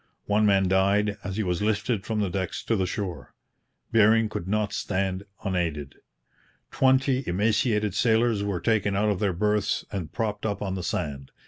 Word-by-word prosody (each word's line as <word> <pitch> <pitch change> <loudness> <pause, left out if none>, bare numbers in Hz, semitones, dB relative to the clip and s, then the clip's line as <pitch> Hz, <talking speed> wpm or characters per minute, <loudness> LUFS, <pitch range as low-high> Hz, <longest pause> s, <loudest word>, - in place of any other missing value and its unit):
One 105 +1 +2
man 95 -2 +3
died 100 +2 +2
as 95 0 -4
he 110 - 0
was 90 -1 -1
lifted 105 0 -1
from 110 -2 -1
the 100 -3 -1
decks 95 -1 -3
to 115 - 0
the 95 -3 0
shore. 90 - -5 0.6
Bering 110 0 +4
could 90 -4 -5
not 105 0 0
stand 95 0 -2 0.2
unaided. 80 -8 -2 0.8
Twenty 130 0 +2
emaciated 105 +2 +1
sailors 115 -1 +2
were 100 -4 -2
taken 105 -3 +1
out 105 +2 +2
of 100 -3 0
their 100 -3 +1
berths 105 +3 0
and 90 -7 -4
propped 105 -3 -3
up 105 -2 -2
on 95 -2 -3
the 95 - -3
sand. 70 -6 -3
100 Hz, 175 wpm, -26 LUFS, 95-110 Hz, 0.8 s, Bering